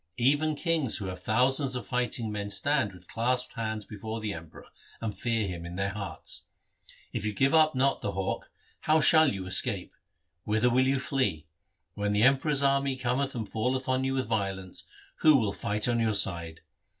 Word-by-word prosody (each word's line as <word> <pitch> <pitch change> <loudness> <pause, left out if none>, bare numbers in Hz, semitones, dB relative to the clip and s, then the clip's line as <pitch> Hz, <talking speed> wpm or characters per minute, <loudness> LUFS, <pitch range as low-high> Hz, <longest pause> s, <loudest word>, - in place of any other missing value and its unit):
Even 145 +5 +2
kings 160 -7 +1
who 100 - -5
have 95 0 -5
thousands 130 +4 +2
of 125 - -4
fighting 125 -3 -1
men 100 -1 -4
stand 130 +2 +1
with 90 -1 -16
clasped 125 +2 -1
hands 110 -2 -3
before 110 +2 -6
the 105 -2 -3
Emperor, 80 -2 -11 0.3
and 110 -2 -4
fear 115 -3 -1
him 85 -2 -6
in 85 +1 -7
their 100 +1 -1
hearts. 100 -1 -5 0.7
If - - -3
you 105 0 -2
give 135 +7 +2
not 155 -3 +4
up 135 +1 +2
the 100 - -3
hawk, 95 0 -3 0.3
how 155 +1 +3
shall 155 0 +5
you 95 -2 -5
escape? 90 - +1 0.5
Whither 110 +3 +2
will 130 +2 +3
you 135 0 +2
flee? 105 - -1 0.5
When 105 0 -1
the 105 +1 +2
Emperor's 140 +2 +3
army 140 -1 +2
cometh 130 +2 -1
and 110 -3 -4
falleth 125 +5 -2
on 130 0 +1
you 135 0 -1
with 130 -1 -1
violence, 95 -4 -3 0.3
who 155 -2 +6
will 105 -5 0
fight 105 +2 0
on 120 -1 +1
your 110 -2 +1
side 85 -5 +1
115 Hz, 185 wpm, -28 LUFS, 100-135 Hz, 0.7 s, who